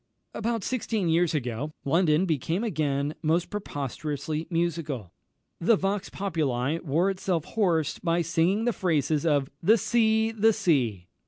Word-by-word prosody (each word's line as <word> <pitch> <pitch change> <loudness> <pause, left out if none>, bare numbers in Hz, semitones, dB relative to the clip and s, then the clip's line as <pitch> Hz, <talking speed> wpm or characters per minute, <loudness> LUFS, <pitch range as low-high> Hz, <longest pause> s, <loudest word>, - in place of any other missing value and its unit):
About 230 -2 -2
sixteen 220 -6 -1
years 165 0 +2
ago, 130 +2 -3
London 160 +3 +3
became 165 - -1
again 150 -7 -1
most 165 +2 +1
preposterously 150 - -4
musical. 165 - -2 0.5
The 220 +7 +4
vox 195 0 -2
populi 155 -6 -1
wore 170 +5 +1
itself 185 -4 -2
hoarse 175 -8 0
by 170 0 +1
singing 175 +7 +1
the 240 - +2
praises 155 -4 0
of 145 -3 +1
"The 220 +7 +5
Sea, 220 0 +2
the 225 0 +3
Sea!" 120 - 0
165 Hz, 135 wpm, -27 LUFS, 150-195 Hz, 0.5 s, The